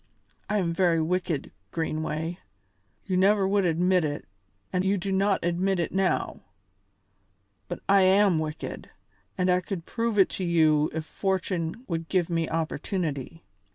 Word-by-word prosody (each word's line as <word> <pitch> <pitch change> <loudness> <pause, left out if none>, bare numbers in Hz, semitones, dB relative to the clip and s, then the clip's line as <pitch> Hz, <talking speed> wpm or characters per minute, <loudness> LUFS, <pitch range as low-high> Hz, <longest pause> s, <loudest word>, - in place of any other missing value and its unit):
I 210 - +1
am 170 -4 0
very 170 -1 +3
wicked, 170 -2 -1 0.2
Greenway; 160 - -3 0.7
you 185 - -1
never 195 +1 +4
would 200 -1 +2
admit 180 +2 +2
it 145 -1 -3 0.5
and 180 0 +1
you 195 +1 +2
do 195 +1 -3
not 195 -1 +1
admit 180 +2 +1
it 170 - -1
now, 190 -1 0 1.3
but 175 - -6
I 195 0 +5
am 190 -2 +4
wicked, 155 -1 -5 0.5
and 180 - +1
I 180 0 +3
could 180 -3 -5
prove 230 -2 -2
it 195 - +5
to 190 - -4
you 155 -3 +3
if 160 0 -4
fortune 190 +2 -2
would 165 -2 -3
give 180 -2 +1
me 165 -1 0
opportunity." 160 -1 -3
180 Hz, 150 wpm, -27 LUFS, 165-190 Hz, 1.3 s, I